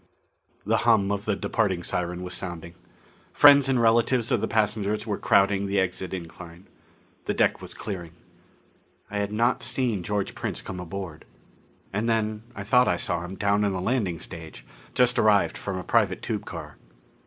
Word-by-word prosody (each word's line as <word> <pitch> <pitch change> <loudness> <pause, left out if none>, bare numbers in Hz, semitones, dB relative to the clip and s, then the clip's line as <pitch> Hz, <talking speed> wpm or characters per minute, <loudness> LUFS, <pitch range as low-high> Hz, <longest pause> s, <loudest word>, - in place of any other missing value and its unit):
The - - +2
hum 110 -4 +3
of 100 0 -2
the 105 - +1
departing 95 -3 -1
siren 90 +1 -3
was 90 0 -5
sounding. 85 -2 -6 0.6
Friends 140 -2 +7
and 130 -2 +2
relatives 115 +1 +3
of - - +2
the - - 0
passengers 105 -1 0
were 105 -3 -3
crowding 100 -2 +3
the 100 0 +1
exit 90 -1 -2
incline. 85 0 -9 0.6
The - - -1
deck - - +2
was - - -8
clearing. 90 -6 -6 1.0
I 105 - -2
had 100 0 -2
not 115 +4 +1
seen 120 -7 -1
George 100 +2 -2
Prince - - -4
come 90 - -6
aboard. 90 -2 -7 0.7
And 110 +4 0
then 110 -1 0
I 100 - -5
thought 125 +5 +4
I 90 - +2
saw 85 0 -2
him 90 +2 -7
down 100 +1 +1
on 100 -1 +1
the 95 - -2
landing 95 -5 -1
stage, 80 -8 -9 0.3
just 125 -1 +3
arrived 105 -2 +3
from 100 -2 -4
a 90 - -5
private - - +1
tube - - -3
car. - - -8
100 Hz, 175 wpm, -26 LUFS, 90-110 Hz, 1.0 s, Friends